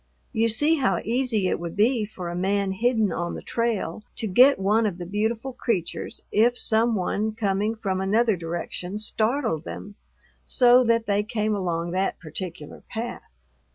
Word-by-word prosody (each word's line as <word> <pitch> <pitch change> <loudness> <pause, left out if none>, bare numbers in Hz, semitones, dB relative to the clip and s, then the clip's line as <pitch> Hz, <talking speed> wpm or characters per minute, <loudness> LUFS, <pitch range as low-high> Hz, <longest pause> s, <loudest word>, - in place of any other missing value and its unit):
You 225 +1 +2
see 295 +9 +4
how 195 - +1
easy 230 -3 +1
it - - -1
would 170 -1 -6
be 220 +1 +2
for 180 -4 -7
a 170 - -5
man 195 +2 0
hidden 220 0 +1
on 170 +1 -3
the - - -8
trail 225 -5 -2
to - - -3
get 250 +8 +6
one 210 +3 +2
of 185 -4 -4
the 175 - -6
beautiful 220 +7 -2
creatures 205 -9 -3
if 235 +3 +3
some 225 +1 +2
one 210 +3 -1
coming 210 0 0
from 190 -4 -2
another 215 +3 +2
direction 175 +3 -5
startled 220 - 0
them 205 +3 -8 0.5
so 250 0 +5
that 230 -1 +2
they 205 -1 +1
came 215 -1 -1
along 175 -4 -2
that 190 +2 -1
particular 165 -2 -7
path. 235 +1 -5
210 Hz, 165 wpm, -25 LUFS, 185-230 Hz, 0.5 s, get